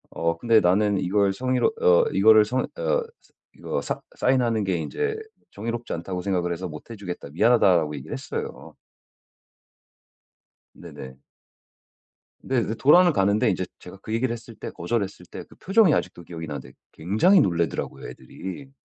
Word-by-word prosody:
어 85 0 -1
근데 115 +4 +4
"나는 100 +3 +2
이걸 100 +1 +1
성의로 130 +3 +1
어 90 -1 +5
이거를 110 +2 +6
성 125 +4 -1
어 - - -5 0.5
서 - - -28 0.2
이거 - - -4
싸 - - -4
싸인하는 120 - +1
게 95 -3 0
인제 440 - -2 0.4
정의롭지 115 +3 -5
않다고 90 +2 -4
생각을 90 -2 -1
해서 90 +2 -5
못 75 +6 -10
해 115 - -7
주겠다. 90 -7 -7
미안하다."라고 90 -3 +3
얘기를 70 - -8
했어요. - - -6 2.0
네네. 65 +1 -11 1.2
네. 130 - -4
그래서 110 0 -3
돌아는 175 +7 +5
가는데 100 -1 +2
인제 95 0 -1
제가 90 +2 -12
그 110 - -6
얘기를 120 +1 0
했을 115 0 -10
때 - - -7
거절을 100 +6 -1
했을 100 0 -9
때 - - -9
그 - - -19
표정이 195 -4 +4
아직도 85 - -2
기억이 80 -1 -8
나는데 70 -3 -7 0.2
굉장히 110 - +3
놀라더라고요, 85 - -2
애들이. 135 +9 -9
100 Hz, 350 characters per minute, -24 LUFS, 90-120 Hz, 2.0 s, 이거를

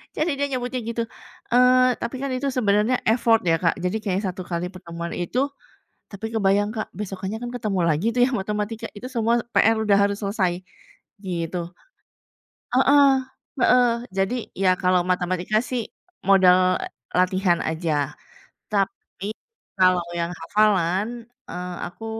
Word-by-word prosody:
jadi 310 +3 0
dia 285 - +2
nyebutnya 250 +1 -3
gitu. 230 0 -1 0.5
Eee, 250 0 +5
tapi 235 +3 -3
kan 275 -1 -2
itu 265 +2 -2
sebenarnya 210 +1 +3
effort 230 -1 +4
ya 165 - +5
Kak. 165 - +3
Jadi 180 +4 0
kayak 195 -2 0
1 185 0 -5
kali 175 0 -2
pertemuan 170 -2 -7
itu 175 +8 -2 0.7
tapi 215 +3 -5
kebayang 205 0 +2
Kak 220 -1 -4
besokannya 195 0 -4
kan 240 - -4
ketemu 205 -5 -1
lagi 160 +7 +1
tuh - - +3
ya 255 - +1
matematika, 210 +1 -3
itu 225 +5 -7
semua 230 -1 +2 0.2
PR 225 +1 +5
udah 215 -2 +3
harus 200 0 +1
selesai 195 -3 +1 0.7
gitu. 175 -1 -3 1.2
Heeh 275 +2 +6 0.5
heeh, 245 +1 +5 0.3
jadi 195 +5 +1 0.3
ya 185 - +5
kalau 180 -1 +3
matematika 180 +3 0
sih 250 -3 -1 0.4
modal 185 -1 +5 0.4
latihan 185 -1 +2
aja. 160 0 -1 0.8
Tapi 200 0 -2 0.5
kalau 185 -1 +4
yang 170 0 -1
hafalan, 205 +4 +1 0.3
eee, 180 0 -5
aku 205 +5 -10
200 Hz, 140 wpm, -23 LUFS, 180-230 Hz, 1.2 s, Heeh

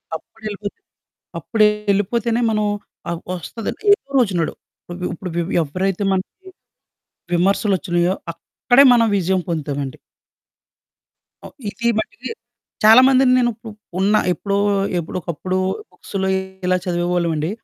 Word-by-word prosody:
అప్పుడేళ్ళిపోతే 205 +4 -7 0.6
అప్పుడే 215 -2 +3 0.2
ఎళ్ళిపోతేనే 230 +4 0
మనం 215 -1 +1 0.4
ఆహ్, 170 -1 -3
వస్తదని 190 +5 -6
ఏదో 405 - -3
రోజునడు. 185 -9 +1 0.6
ఇప్పుడు 180 +2 -6
వి 175 - +1
వి - - -2
ఎవ్వరైతే 185 +6 -2
మనకి 375 - -5 0.8
విమర్శలోచ్చినాయో 180 -1 +1 0.2
అక్కడే 245 +10 +3
మనం 230 -1 +4
విజయం 190 0 +1
పొందుతామండి. 145 -4 -3 1.5
ఓ - - -6 0.2
ఇది 235 +3 -3
మటికీ 220 - -4 0.5
చాలా 220 +4 +9
మందిని 265 -1 +4
నేను 240 -1 +3
ఉపు 225 +1 -11 0.3
ఉన్నా 205 +3 +3
ఎప్పుడో 200 +2 -2 0.4
ఎప్పుడో 170 +2 -5
ఒకప్పుడు 180 +3 -3 0.3
బుక్స్‌లో 190 -1 -4 0.4
ఇలా 185 0 +3
చదివేవాళ్ళమండి. 175 -3 0
190 Hz, 110 wpm, -20 LUFS, 175-220 Hz, 1.5 s, చాలా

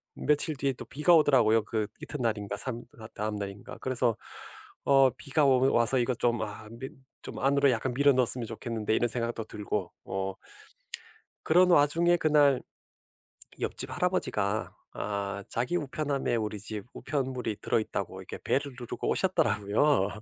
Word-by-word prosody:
며칠 150 0 +2
뒤에 135 +1 0
또 - - -9
비가 150 +6 +2
오더라고요. 120 -8 +4
그 110 0 -2
이튿날인가 110 -7 -3
삼 120 0 -2 0.2
다 110 - -9
다음날인가. 105 -1 -5
그래서 125 -3 0 0.7
어 135 -1 +5
비가 145 +1 0
오 130 0 +4
와서 120 +2 +3
'이거 120 +1 +1
좀 120 0 +1 0.4
밀 130 - -6 0.3
좀 - - -6
안으로 140 0 +3
약간 125 +2 -1
밀어 140 +3 +4
넣었으면 125 -2 +4
좋겠는데.' 115 -1 -2
이런 120 - +2
생각도 115 0 -2
들고. 105 -1 -4
어. 95 0 -3 1.1
그런 180 +3 +4
와중에 170 +3 +4
그날 145 -4 +3 1.0
옆집 - - 0
할아버지가 - - -1 0.2
아 100 -1 -4
자기 125 +9 -1
우편함에 145 -4 -2
우리 105 -2 -3
집 105 +1 -5
우편물이 130 -6 -3
들어있다고 110 - -2
이렇게 - - -8
벨을 140 -1 0
누르고 120 - -5
오셨더라고요. 110 - +2
125 Hz, 325 characters per minute, -28 LUFS, 110-140 Hz, 1.1 s, 어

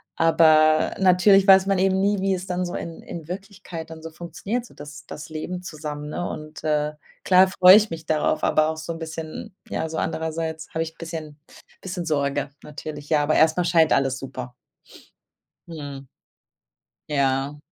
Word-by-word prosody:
Aber 155 -1 +4
natürlich 190 +1 +5
weiß 190 0 +7
man 195 -2 +1
eben 190 0 +2
nie, 200 +1 +1
wie 195 -1 +1
es 180 +1 -6
dann 180 -1 -2
so 175 0 -4
in 165 -1 -6
in 165 -3 -8
Wirklichkeit 185 -3 -8
dann 160 0 -10
so 165 - -7
funktioniert, 175 +9 -4
so 240 - -17
das 150 0 -11
das 150 - -8
Leben 180 +3 -5
zusammen, 150 -2 -6
ne? 175 +3 -3
Und, 155 0 -8
äh, 150 -1 0 0.3
klar 185 0 +6
freue 185 0 +7
ich 215 0 +2
mich 160 -1 -7
darauf, 155 0 0
aber 155 0 +3
auch 160 - -4
so 160 +1 -5
'n 165 - -9
bisschen 160 +2 -7
ja, 160 - -2
so 160 - -5
andererseits 160 0 -3
habe 160 - -2
ich 160 - -7
'n - - -39
bisschen 160 -3 -7 0.4
bisschen 180 -2 -5
Sorge 145 -2 -1
natürlich. 150 0 -8
Ja, 150 -2 +3
aber 155 - +1
erst 160 +2 +4
mal 180 - +2
scheint 165 -3 +4
alles 135 -1 +2
super. 130 -2 -7 1.2
Mhm. 140 -4 -8 1.0
Ja. 140 0 0
160 Hz, 180 wpm, -23 LUFS, 150-180 Hz, 1.2 s, weiß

